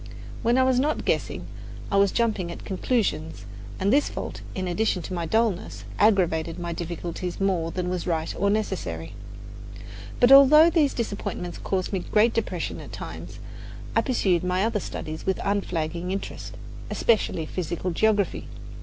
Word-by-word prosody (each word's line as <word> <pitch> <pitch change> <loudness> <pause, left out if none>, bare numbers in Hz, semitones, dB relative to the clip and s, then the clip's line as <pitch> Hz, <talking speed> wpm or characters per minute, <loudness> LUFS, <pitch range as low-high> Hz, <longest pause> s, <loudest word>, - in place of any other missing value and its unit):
When 235 +2 +2
I 260 - +5
was 260 -1 +3
not 300 +4 0
guessing, - - -1 0.5
I 200 - +3
was 200 -1 +4
jumping 210 -7 0
at - - -9
conclusions, 185 - -1 0.3
and 200 +4 +2
this 290 +1 +3
fault, - - -6
in 185 -1 -2
addition 180 0 0
to 185 - -6
my 170 -2 -2
dullness, 200 - 0 0.2
aggravated 170 -6 +2
my 170 -1 -4
difficulties 170 +1 -5
more 185 -4 +1
than 180 +1 -3
was 180 -1 -2
right 160 -2 -1
or 200 - +1
necessary. 180 - -2 1.1
But 245 +1 +5
although 300 +4 +9
these 300 -5 +2
disappointments 200 -6 -4
caused 190 +1 -2
me 190 - +1
great 215 +5 +2
depression 230 - -2
at - - -10
times, - - -8 0.6
I - - +5
pursued 190 - +1
my 180 +2 +1
other 225 -2 0
studies 155 -3 -6
with 190 - +1
unflagging 175 -4 -1
interest, 195 +1 -5 0.3
especially 205 -7 +1
physical 175 +2 -3
geography. 205 +2 +1
190 Hz, 155 wpm, -25 LUFS, 170-220 Hz, 1.1 s, although